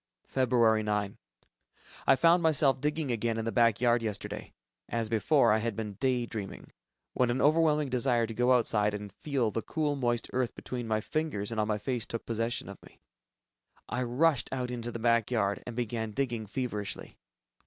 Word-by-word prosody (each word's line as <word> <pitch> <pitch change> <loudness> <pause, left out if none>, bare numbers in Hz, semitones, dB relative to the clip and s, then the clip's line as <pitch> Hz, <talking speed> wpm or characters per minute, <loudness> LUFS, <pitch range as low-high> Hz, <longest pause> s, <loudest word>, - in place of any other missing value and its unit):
Feb. 115 -4 +3
9. 105 -1 -1 0.9
I - - +7
found 170 +6 +4
myself 145 -5 +3
digging 150 -1 -1
again 115 0 -1
in 110 - -2
the 115 - -1
back 115 -3 +3
yard 120 -1 +3
yesterday. 105 -3 -5 0.4
As 115 -2 -1
before, 115 +3 +3
I 110 - +2
had 115 -1 -2
been 105 -1 -4
"day 125 +2 0
dreaming," 105 -4 -7 0.4
when 125 -1 +2
an 120 +2 0
overwhelming 150 -1 +3
desire 125 -2 +2
to 115 - -6
go 125 +3 +2
outside 105 -4 +2
and 105 -2 -7
feel 130 -3 -1
the 115 - -2
cool 150 +1 -1
moist 120 -4 0
earth 125 -2 -1
between 120 -2 -5
my 110 -1 0
fingers 120 -8 -2
and 110 -1 0
on 105 - -1
my 105 -1 0
face 120 +2 -3
took 115 - -5
possession 115 +1 -2
of - - -10
me. - - -18 0.9
I 125 - -2
rushed 130 +3 +2
out 125 -2 -2
into 120 -1 -4
the 115 - -5
back 115 -1 +2
yard, 100 -5 0
and 120 - -6
began 115 -2 -3
digging 120 -4 -2
feverishly 105 -3 -4
120 Hz, 185 wpm, -30 LUFS, 110-130 Hz, 0.9 s, I